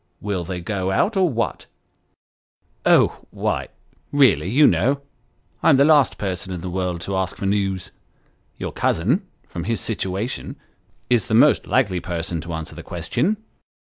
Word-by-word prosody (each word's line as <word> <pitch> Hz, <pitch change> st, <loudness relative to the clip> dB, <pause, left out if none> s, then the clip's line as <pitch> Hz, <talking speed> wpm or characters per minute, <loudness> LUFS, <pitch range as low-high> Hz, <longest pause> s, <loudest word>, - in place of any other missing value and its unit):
Will 100 Hz, -4 st, -2 dB
they 90 Hz, +1 st, -5 dB
go 95 Hz, 0 st, -2 dB
out, 195 Hz, -, +1 dB
or 185 Hz, -2 st, +3 dB
what? 115 Hz, -4 st, -2 dB, 0.4 s
" -, -, -52 dB
" -, -, -39 dB
Oh -, -, 0 dB
why -, -, -2 dB, 0.4 s
really, 135 Hz, -10 st, +4 dB
you 145 Hz, +7 st, +5 dB
know, 140 Hz, +2 st, +3 dB, 0.6 s
I'm -, -, +5 dB
the 140 Hz, -, +5 dB
last 150 Hz, -5 st, +4 dB
person 95 Hz, -1 st, -4 dB
in 90 Hz, -2 st, -4 dB
the 90 Hz, 0 st, -5 dB
world 90 Hz, -2 st, -2 dB
to 95 Hz, +3 st, -3 dB
ask 95 Hz, 0 st, -2 dB
for -, -, -4 dB
news. 95 Hz, -2 st, -1 dB, 0.7 s
Your -, -, -4 dB
cousin, 130 Hz, -, 0 dB, 0.2 s
from 85 Hz, -2 st, -6 dB
his 115 Hz, +2 st, -1 dB
situation, 110 Hz, +6 st, -3 dB, 0.6 s
is 120 Hz, -5 st, +3 dB
the 110 Hz, -, +1 dB
most 145 Hz, +5 st, +5 dB
likely 100 Hz, -9 st, +2 dB
person 85 Hz, -1 st, -3 dB
to 85 Hz, +2 st, -6 dB
answer 80 Hz, -1 st, -5 dB
the -, -, -8 dB
question." 210 Hz, +6 st, -1 dB
100 Hz, 165 wpm, -22 LUFS, 90-130 Hz, 0.7 s, you